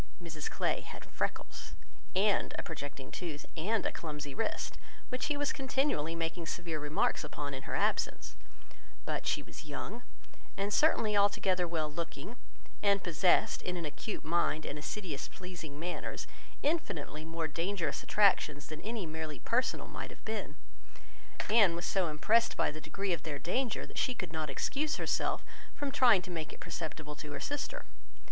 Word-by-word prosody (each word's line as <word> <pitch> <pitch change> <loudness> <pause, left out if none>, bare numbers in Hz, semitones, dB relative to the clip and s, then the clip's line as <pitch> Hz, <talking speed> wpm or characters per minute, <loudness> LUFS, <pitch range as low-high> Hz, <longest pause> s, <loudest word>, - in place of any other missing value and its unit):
Mrs 160 -4 -4
Clay - - +1
had - - -9
freckles, - - -3 0.4
and 200 +2 +3
a - - -2
projecting 145 -4 -6
tooth, 160 -5 -4
and 205 +6 +1
a - - +2
clumsy 150 -3 -4
wrist, 225 - -1 0.3
which 250 0 -1
he 295 -1 +1
was 290 0 +1
continually 265 - +1
making 165 0 -2
severe 170 -2 -2
remarks 150 +2 +2
upon, 145 -2 -4
in 135 - -3
her - - 0
absence; - - +1 0.7
but - - -1
she - - +2
was - - -9
young, 150 - -4 0.6
and 200 +1 0
certainly 220 -6 +4
altogether 195 -3 +4
well 160 -2 0
looking, 170 +8 -5 0.5
and 200 -1 +4
possessed, 175 +1 +4
in 180 0 -2
an 170 - -2
acute 150 +8 -4
mind 160 -1 +2
and 150 - -3
assiduous 160 -2 -3
pleasing 170 -6 -7
manners, 175 +2 -3 0.4
infinitely 165 - 0
more 165 0 -1
dangerous 170 +3 -1
attractions 155 -8 +4
than 155 0 -6
any 220 -3 -2
merely 160 -2 -4
personal 250 +2 +1
might - - -5
have - - -13
been. - - -2 0.9
Anne 205 -6 +6
was 170 +1 -2
so 190 -3 +2
impressed 215 +10 +3
by - - +3
the 155 +1 -7
degree 190 +4 -1
of 165 - -1
their 155 -3 -3
danger, 240 - 0
that - - -4
she 255 - +2
could 180 -7 -4
not 155 -2 -1
excuse 290 - 0
herself - - +1 0.3
from 285 -1 -1
trying 235 -9 +6
to 185 - -6
make 160 -3 -3
it - - -11
perceptible 155 -1 -4
to 150 0 -6
her - - -3
sister. 290 - -2
170 Hz, 165 wpm, -34 LUFS, 155-210 Hz, 0.9 s, Anne